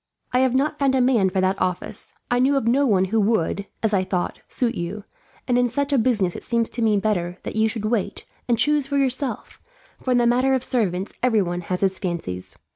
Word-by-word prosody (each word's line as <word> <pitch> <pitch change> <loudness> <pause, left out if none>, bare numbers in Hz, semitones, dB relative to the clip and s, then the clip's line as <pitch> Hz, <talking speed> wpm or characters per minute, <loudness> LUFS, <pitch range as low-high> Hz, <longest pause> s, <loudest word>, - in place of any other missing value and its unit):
"I 250 - +4
have 260 -1 +2
not 295 +3 0
found 275 -2 +2
a - - +3
man 245 -7 +3
for 190 0 0
that 190 +1 0
office. 180 -1 -3 0.2
I 245 - +3
knew 270 +3 +3
of 270 - -1
no 270 +4 +3
one 190 -4 +3
who 225 - +4
would, 200 -2 0 0.2
as 220 -1 +1
I 190 -2 +3
thought, 180 -1 -2
suit 240 -2 0
you; 200 +1 -5 0.4
and 245 -1 +3
in 245 - +3
such 285 +4 -1
a 270 - +4
business 215 -7 +1
it - - -7
seemed 235 -1 +1
to 235 - -4
me 215 -2 +3
better 180 -4 -1
that - - -6
you 220 0 +2
should 220 -2 -4
wait, 215 -2 -2 0.2
and 240 -1 +2
choose 295 +2 +2
for 280 0 -1
yourself, 270 0 -2 0.4
for - - -5
in 250 - +4
the 240 - +3
matter 255 +3 +3
of 255 - -2
servants 195 -6 0
everyone 200 -8 +1
has 180 +1 -3
his 190 -1 +1
fancies. 165 - -5
225 Hz, 230 wpm, -23 LUFS, 190-255 Hz, 0.4 s, I